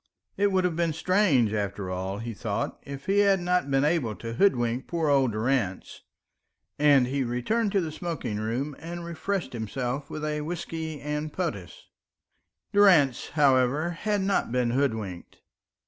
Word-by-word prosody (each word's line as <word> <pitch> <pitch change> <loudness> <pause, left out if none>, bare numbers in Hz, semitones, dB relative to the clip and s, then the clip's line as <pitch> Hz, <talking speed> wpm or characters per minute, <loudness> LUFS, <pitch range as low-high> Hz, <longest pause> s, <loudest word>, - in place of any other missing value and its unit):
It 205 0 +2
would 190 -1 +2
have 180 -3 0
been 165 -1 0
strange, 160 - +2
after 100 -2 -3
all, 95 +2 -3
he 115 +2 -5
thought, - - -3
if 140 0 -8
he 200 +1 +2
had 200 -1 +4
not 180 -4 0
been 135 +1 +2
able 150 -9 +1
to 115 0 -6
hoodwink 120 -7 +1
poor 165 -3 0
old 135 -4 +3
Durrance; 110 -3 -1 0.8
and 145 -3 +5
he 135 +2 -1
returned 195 - 0
to 195 - +3
the 160 -2 -3
smoking 155 -9 -4
room 125 +7 -2
and 170 +1 -7
refreshed 170 -2 -3
himself 125 +5 -3
with 155 0 -5
a 150 0 -2
whiskey 160 -1 -5
and 150 +1 -3
potass. 100 - -4 0.9
Durrance, 175 -11 +5
however, 140 +3 +3
had 205 +4 -1
not 195 -9 0
been 125 -1 +1
hoodwinked. 110 -9 -2
145 Hz, 155 wpm, -27 LUFS, 120-170 Hz, 0.9 s, and